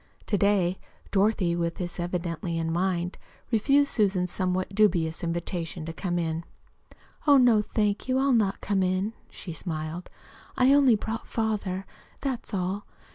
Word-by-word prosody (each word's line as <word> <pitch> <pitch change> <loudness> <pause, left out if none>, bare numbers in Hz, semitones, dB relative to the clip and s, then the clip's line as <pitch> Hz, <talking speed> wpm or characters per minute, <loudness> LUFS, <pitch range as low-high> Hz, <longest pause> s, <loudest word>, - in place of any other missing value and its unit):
To 210 - 0
day 190 -3 +2 0.3
Dorothy, 195 -4 +2
with 170 -1 -1
this 175 -1 -5
evidently 175 -1 -2
in 165 0 -1
mind, 180 0 -1 0.3
refused 275 +6 +3
Susan's 190 -5 +1
somewhat 185 +1 -1
dubious 175 -6 +2
invitation 170 -1 -3
to 165 - -5
come 175 0 -2
in. 165 -1 -1 0.8
"Oh, 285 -1 +8
no, 240 -4 +5
thank 210 0 -1
you, 260 0 +2
I'll 270 0 +3
not 210 -4 +1
come 195 -1 0
in," 185 +4 0 0.2
she 175 - -7
smiled. 160 +1 -5 0.5
"I 260 +2 +5
only 275 -5 +6
brought 220 +2 -4
father, 205 -4 -2 0.3
that's 265 -4 -4
all. 195 +1 -2
190 Hz, 145 wpm, -27 LUFS, 170-215 Hz, 0.8 s, Oh